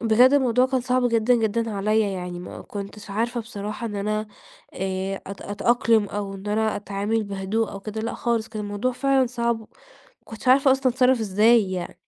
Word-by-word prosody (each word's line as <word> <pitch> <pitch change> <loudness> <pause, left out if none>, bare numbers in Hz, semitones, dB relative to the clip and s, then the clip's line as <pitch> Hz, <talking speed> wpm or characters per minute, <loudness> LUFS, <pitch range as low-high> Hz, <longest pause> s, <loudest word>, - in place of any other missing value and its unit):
بجد 235 +3 +5
الموضوع 255 -3 +3
كان 260 0 0
صعب 250 0 +1
جدًا، 230 +1 +3
جدًا، 225 0 0
عليَّ 215 +2 +1
يعني 180 -1 -5
ما 180 - -8
كُنتش 205 +1 -8
عارفة 235 +4 -1
بصراحة 215 0 -6
إن 210 -2 -5
أنا 215 +2 -1 0.5
آآ، 190 +1 -2
أت 195 -1 -8
أتأقلم 225 +1 +2
أو 200 -1 -4
إن 195 +1 -10
أنا 215 +1 0
أتعامل 205 +2 -2
بهدوء 200 +3 -2
أو 195 - -7
كده، 215 +2 -5
لأ 230 +1 -3
خالص 230 -2 -1
كان 215 -1 -5
الموضوع 205 +5 -2
فعلًا 265 +1 +2
صعب، 235 -1 -1
ما 220 - -13 0.6
كُنتش 225 +3 -9
عارفة 265 +1 +6
أصلًا 265 -1 +2
أتصرف 255 0 +3
إزاي 215 0 +3
يعني. 180 -1 -5
220 Hz, 185 wpm, -24 LUFS, 200-240 Hz, 0.6 s, عارفة